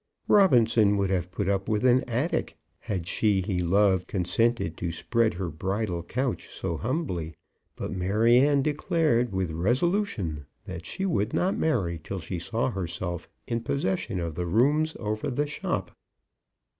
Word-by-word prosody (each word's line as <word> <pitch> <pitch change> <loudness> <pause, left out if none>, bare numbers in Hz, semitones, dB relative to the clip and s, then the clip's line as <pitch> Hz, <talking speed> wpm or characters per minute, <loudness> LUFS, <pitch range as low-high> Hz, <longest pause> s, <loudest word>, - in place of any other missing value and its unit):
Robinson 115 - +5
would 100 -1 0
have 90 -2 0
put 100 +1 -3
up 100 -1 0
with 110 +2 +1
an 125 +1 +5
attic, 125 +8 -1 0.2
had 95 -5 -3
she 100 +2 +2
he 95 -1 -1
loved 95 +1 +3
consented 95 0 0
to 85 -1 -2
spread 85 +6 0
her 90 -1 -3
bridal 95 +2 -2
couch 125 +9 -3
so 85 - -4
humbly; 95 - -2 0.4
but - - -5
Maryanne 120 +9 +3
declared 150 -5 +1
with 95 -3 -1
resolution 105 - 0 0.2
that 85 -2 -7
she 195 - -3
would 105 - 0
not 185 +2 +1
marry 95 - 0
till 95 - -5
she 90 0 -5
saw 115 +8 -1
herself 90 -2 -4 0.2
in 115 0 -2
possession 95 -7 -1
of 85 -2 -3
the 90 +3 -3
rooms 145 - +2
over 110 +2 -2
the 145 +3 0
shop. 145 - -3
105 Hz, 150 wpm, -27 LUFS, 90-125 Hz, 0.4 s, Robinson